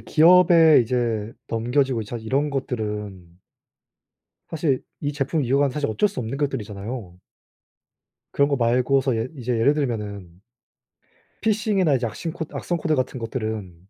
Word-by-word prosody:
기업에 165 Hz, -2 st, +6 dB
이제 115 Hz, -2 st, -1 dB, 0.2 s
넘겨지고 120 Hz, +1 st, 0 dB
자 115 Hz, +3 st, -6 dB
이런 135 Hz, +6 st, -1 dB
것들은 105 Hz, -9 st, -5 dB, 1.1 s
사실 155 Hz, -5 st, 0 dB, 0.2 s
이 145 Hz, 0 st, -2 dB
제품을 140 Hz, +1 st, -1 dB
이어간 135 Hz, +2 st, +2 dB
사실 145 Hz, 0 st, -2 dB
어쩔 205 Hz, -, +2 dB
수 195 Hz, -, -6 dB
없는 120 Hz, +5 st, -4 dB
것들이잖아요. 105 Hz, -7 st, -4 dB, 1.1 s
그런거 140 Hz, 0 st, +2 dB
말고서 125 Hz, +1 st, +2 dB
예 115 Hz, +3 st, -2 dB
이제 125 Hz, -1 st, -2 dB
예를 140 Hz, +6 st, +4 dB
들면은 105 Hz, -, -3 dB, 1.1 s
피싱이나 205 Hz, -8 st, +2 dB
이제 120 Hz, -2 st, -1 dB
악싱코 160 Hz, +7 st, -5 dB
악성코드 165 Hz, -3 st, -1 dB
같은 130 Hz, -1 st, -2 dB
것들은 110 Hz, -5 st, -4 dB
130 Hz, 300 characters per minute, -23 LUFS, 110-145 Hz, 1.1 s, 기업에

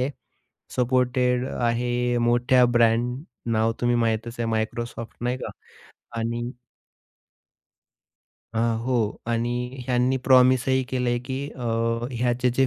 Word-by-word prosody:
आहे. 130 Hz, +3 st, 0 dB, 0.7 s
सपोर्टेड 125 Hz, 0 st, +2 dB
आहे. 120 Hz, +1 st, 0 dB
मोठ्या 125 Hz, +1 st, +4 dB
ब्रँड 120 Hz, +3 st, +2 dB, 0.3 s
नाव, 110 Hz, +1 st, +2 dB
तुम्ही 120 Hz, 0 st, +2 dB
माहीतच 115 Hz, +1 st, -1 dB
आहे 115 Hz, -, 0 dB
Microsoft 115 Hz, +1 st, -3 dB
नाही 125 Hz, +1 st, 0 dB
का -, -, -4 dB, 0.7 s
आणि 120 Hz, +1 st, -2 dB, 2.1 s
अ, -, -, 0 dB, 0.3 s
हो 130 Hz, -, 0 dB, 0.4 s
आणि 120 Hz, +2 st, -2 dB
ह्यांनी 125 Hz, +1 st, +2 dB
प्रॉमिसही 130 Hz, 0 st, +5 dB
केलंय 125 Hz, -2 st, 0 dB
की 130 Hz, -, -3 dB
अ, 125 Hz, -, -10 dB, 0.5 s
ह्याचे 125 Hz, +1 st, +1 dB
जे 135 Hz, 0 st, +3 dB
120 Hz, 110 wpm, -24 LUFS, 120-125 Hz, 2.1 s, प्रॉमिसही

